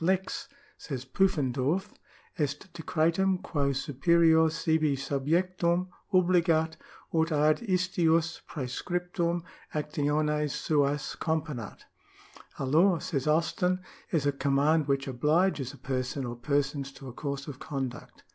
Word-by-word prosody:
Lex, 190 +2 0 0.3
says 135 -4 -5
Pufendorf,^ 145 +1 +1 0.5
est 150 +3 -3
decretum 170 +3 +1
quo 145 -6 -1
superior 160 +4 +3
sibi 160 -2 +1
subjectum 170 +6 0 0.2
obligat, 170 -3 +3 0.4
ut 160 0 +2
ad 150 0 +3
istius 175 -6 +1
praescriptum 175 +5 -2 0.3
actiones 150 0 0
suas 145 -1 0
componat. 150 -9 -3 0.4
" - - -21
A 135 - -2
law," 170 +7 +4
says 145 -3 -3
Austin,^ 175 +4 +2 0.2
" - - -26
is 155 -5 +1
a 145 - +3
command 140 +3 +2
which 140 0 0
obliges 150 +2 +1
a 140 - -13
person 130 +1 -3
or 120 0 -4
persons 140 +1 -1
to 135 0 -11
a 125 - -7
course 140 0 -4
of 140 -3 -7
conduct." 135 -4 -5
155 Hz, 120 wpm, -29 LUFS, 140-170 Hz, 0.5 s, law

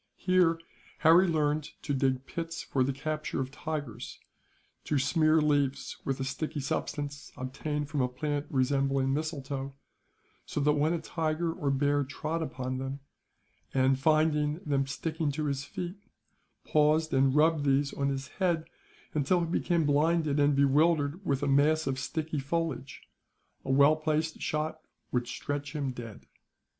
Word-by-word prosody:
Here 180 -3 +3 0.4
Harry 170 +4 +6
learned 155 -2 0
to 145 - -1
dig 130 -1 +1
pits 165 +2 -5
for 130 - +1
the 135 - 0
capture 155 +3 -3
of 130 0 -2
tigers; 145 -7 -5 0.7
to 150 - +1
smear 155 +3 +3
leaves 145 -3 +1
with 135 -1 -2
a - - -1
sticky 135 +3 -3
substance, 145 +1 -3
obtained 145 +3 -3
from 145 -1 -1
a 125 - +2
plant 145 +3 -3
resembling 135 0 +1
mistletoe, 140 -3 -3 0.7
so - - -4
that 150 +1 +4
when 150 +3 +2
a 170 - -1
tiger 165 +1 -1
or 150 -5 -2
bear 145 +1 +2
trod 155 +5 -3
upon 130 -4 -3
them 135 +1 -5 0.7
and, 130 0 +3
finding 150 0 +3
them 140 -2 +1
sticking 160 +2 -2
to 155 +1 -2
his 140 -1 -2
feet, 180 +6 -6 0.7
paused 155 +1 +3
and 135 0 +3
rubbed 155 0 +4
these 140 0 +2
on 140 0 0
his 135 0 -3
head, 170 -4 +1 0.5
until 155 +4 +2
he - - 0
became 170 -1 +1
blinded 150 0 +2
and 145 0 +4
bewildered 145 +4 +3
with 140 -5 0
a - - +1
mass 150 +3 +3
of 135 -1 -1
sticky 155 +2 -3
foliage, 140 -2 -3 0.6
a - - -7
well 140 +3 +6
placed 155 0 -1
shot 155 +1 -2 0.3
would 125 -1 0
stretch 145 +2 -4
him 140 -3 -1
dead. 115 -4 -9
145 Hz, 150 wpm, -29 LUFS, 135-155 Hz, 0.7 s, Harry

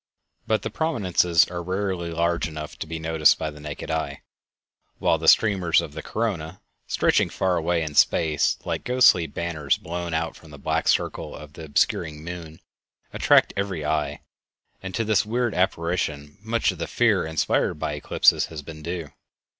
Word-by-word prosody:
But 110 -1 +1
the - - -3
prominences 95 - +2
are 85 -1 -4
rarely 95 -1 -2
large 85 -2 0
enough 75 -1 -7
to - - -5
be 80 +1 -4
noticed 80 -1 +3
by 80 -1 -3
the 75 - -12
naked 75 +1 -6
eye, 80 -3 -3 0.7
while 80 - +2
the 80 - -4
streamers 95 -6 +5
of - - -5
the - - -6
corona, 95 -7 -3 0.3
stretching - - +2
far 95 -1 0
away 85 0 0
in 75 -1 -5
space, 75 0 +3
like - - -3
ghostly 125 -9 +4
banners 80 -5 -1
blown 85 0 -4
out 80 0 -2
from 80 - -15
the 75 - -11
black 70 - -1
circle - - 0
of 75 0 -11
the 80 0 -9
obscuring 75 +1 0
moon, 85 -2 -8 0.5
attract - - +4
every 95 -6 -2
eye, 75 0 -1 0.6
and 95 -1 -6
to 115 - 0
this 110 -1 +3
weird 120 +1 -1
apparition 85 -4 -1
much 115 +1 +1
of - - -11
the - - -3
fear - - +2
inspired 80 -2 0
by 75 - -3
eclipses 75 - +3
has 80 -3 -8
been 75 +1 -10
due. 85 -2 -5
85 Hz, 170 wpm, -24 LUFS, 75-95 Hz, 0.7 s, streamers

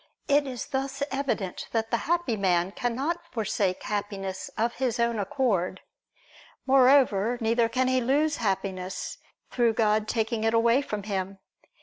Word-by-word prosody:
It 285 0 +3
is 250 -3 -5
thus 270 +1 -3
evident 265 -9 -2
that 225 -1 -1
the 235 - +3
happy 345 -9 +1
man 185 -2 +1
cannot 265 +10 -2
forsake 205 -5 -1
Happiness 195 -2 -4
of 230 +2 +1
his 250 -2 -1
own 235 -1 +1
accord. 195 -4 0 0.8
Moreover, 255 -4 +4
neither 230 0 +2
can 255 +2 +1
he 255 0 +2
lose 290 +5 +1
Happiness, 190 -2 -3 0.3
through 235 -2 +2
God 215 -1 +2
taking 220 0 -1
it 225 +1 +2
away 235 +3 +4
from 210 -7 -5
him. 195 -1 -3
230 Hz, 140 wpm, -27 LUFS, 200-260 Hz, 0.8 s, Moreover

